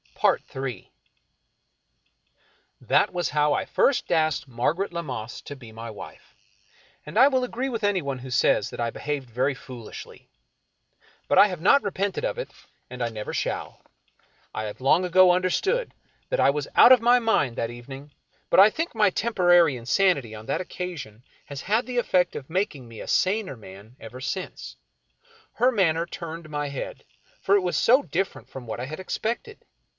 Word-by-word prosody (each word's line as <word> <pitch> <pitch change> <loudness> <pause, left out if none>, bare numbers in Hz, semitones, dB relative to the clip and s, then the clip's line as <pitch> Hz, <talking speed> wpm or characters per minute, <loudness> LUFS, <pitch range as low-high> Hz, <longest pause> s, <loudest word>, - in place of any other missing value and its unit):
Ill 135 -1 0 2.1
That - - +2
was 175 -3 -2
how 150 0 +2
I - - -1
first 275 -3 +1
asked 155 -4 +1
Margaret 150 +10 -1
Lammas 130 -9 -5
to 145 - -7
be 120 -5 -13
my 115 +1 -8
wife, 105 - -12 0.7
and 150 - -6
I 270 - +8
will 260 -2 +1
agree 250 +2 -3
with 230 -3 -4
anyone 175 -10 0
who 130 +1 -9
says 120 -4 +2
I 115 -1 -3
behaved 145 -2 -4
very 130 +4 0
fooHshly. 125 -5 -11 1.0
But - - +4
I 205 - +8
have 180 -5 -6
not 280 +10 +5
repented 200 - -2
of - - -2
it, - - -5 0.4
and 125 0 -9
I 120 - -1
never 110 -2 -6
shall. - - -3 0.7
I 110 - -3
have 105 - -7
long 140 +7 +3
ago 180 +1 +6
understood 385 - 0 0.4
that - - -1
I - - +5
was 145 0 -3
out 245 - +8
of 255 -3 +8
my 240 +1 +5
mind 185 - +1
that 115 0 -2
evening, 135 +4 -10 0.4
but - - +5
I 200 +2 +9
think 330 +9 -4
my 215 -3 +4
temporary 175 - +3
insanity 125 - +1
on 110 0 -10
that - - -1
occasion 170 - -7 0.2
has 140 -1 -7
had 220 - 0
the 250 -1 -4
effect 180 -7 +2
of 135 - -7
making 160 - -2
me 115 -1 -10
a - - -8
saner 195 -4 +1
man 100 +3 -13
ever 120 +3 -10
since. 185 +7 -5 0.8
Her 250 +3 +3
manner 170 -7 +1
turned 170 -1 -8
my 145 -1 -3
head, 140 - -7 0.4
for 200 - +3
it 200 - +4
was 180 -1 -1
so 260 +4 +4
different 190 -3 -3
from 130 -3 -9
what 110 - -5
I 125 - -3
had 155 +5 -7
expected. 235 - -4
165 Hz, 170 wpm, -25 LUFS, 130-200 Hz, 2.1 s, I